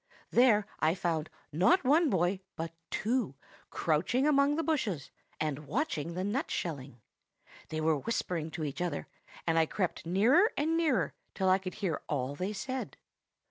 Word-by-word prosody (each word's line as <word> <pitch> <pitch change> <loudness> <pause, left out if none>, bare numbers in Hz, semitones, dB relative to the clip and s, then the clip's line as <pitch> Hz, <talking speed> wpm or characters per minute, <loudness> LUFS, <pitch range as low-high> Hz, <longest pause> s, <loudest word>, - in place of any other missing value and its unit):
There 230 -4 +5
I 160 +2 +3
found, 165 -4 -1 0.2
not 190 - +4
one 300 +4 +4
boy, 185 -1 +1 0.2
but 165 0 -4 0.2
two, 225 - 0 0.3
crouching 175 - +1
among 285 0 +4
the 325 - 0
bushes, 215 - -1 0.3
and 150 -1 -2
watching 170 - -1
the 185 - -2
nut 225 +9 -1
shelling. 140 -7 -4 0.7
They 155 0 -2
were 155 -1 +3
whispering 170 - -2
to 160 - -3
each 145 +3 -4
other; 170 -5 -2 0.4
and 165 -1 +3
I 160 - +3
crept 180 -3 -2
nearer 245 - +5
and 315 +3 +1
nearer 320 -7 +2 0.2
till 190 -1 +2
I 185 +1 +5
could 185 -1 -6
hear 190 -8 -2
all 135 -1 -1
they 185 +7 -3
said. 255 +5 -4
185 Hz, 160 wpm, -31 LUFS, 160-255 Hz, 0.7 s, There